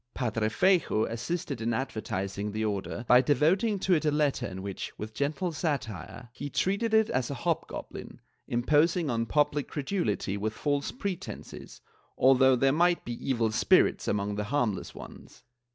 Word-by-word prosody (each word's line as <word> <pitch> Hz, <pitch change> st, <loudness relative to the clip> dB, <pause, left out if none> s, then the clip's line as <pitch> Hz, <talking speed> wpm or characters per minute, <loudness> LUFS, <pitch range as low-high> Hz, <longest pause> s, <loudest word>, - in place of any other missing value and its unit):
Padre 115 Hz, -4 st, 0 dB
Feyjoo 155 Hz, -, +2 dB
assisted 140 Hz, +2 st, -4 dB
in 115 Hz, 0 st, 0 dB
advertising 105 Hz, -5 st, -3 dB
the 110 Hz, +1 st, -2 dB
Order 105 Hz, +3 st, -3 dB
by 125 Hz, +1 st, +7 dB
devoting 165 Hz, -, +2 dB
to 190 Hz, -1 st, +1 dB
it 160 Hz, -, +2 dB
a 155 Hz, -, +3 dB
letter 150 Hz, -2 st, +1 dB
in 95 Hz, 0 st, -7 dB
which, 100 Hz, -1 st, -5 dB
with 110 Hz, +1 st, -7 dB
gentle 155 Hz, -, -1 dB
satire, 125 Hz, -, -4 dB
he 145 Hz, -, -6 dB
treated 200 Hz, -, 0 dB
it 220 Hz, 0 st, +3 dB
as 125 Hz, -1 st, 0 dB
a 140 Hz, -, -3 dB
hobgoblin, 165 Hz, +5 st, -4 dB, 0.3 s
imposing 150 Hz, +6 st, +2 dB
on 115 Hz, -1 st, -1 dB
public 145 Hz, 0 st, +1 dB
credulity 135 Hz, -, -2 dB
with 110 Hz, +2 st, -2 dB
false 140 Hz, +6 st, -1 dB
pretences, 200 Hz, -8 st, -7 dB, 0.4 s
although 130 Hz, 0 st, +5 dB
there 135 Hz, +2 st, +3 dB
might 175 Hz, +2 st, +2 dB
be 120 Hz, -, -4 dB, 0.2 s
evil 115 Hz, -4 st, +1 dB
spirits 110 Hz, -, +3 dB
among 100 Hz, 0 st, 0 dB
the 105 Hz, 0 st, -3 dB
harmless 120 Hz, -4 st, -1 dB
ones. -, -, -12 dB
130 Hz, 155 wpm, -28 LUFS, 110-155 Hz, 0.4 s, by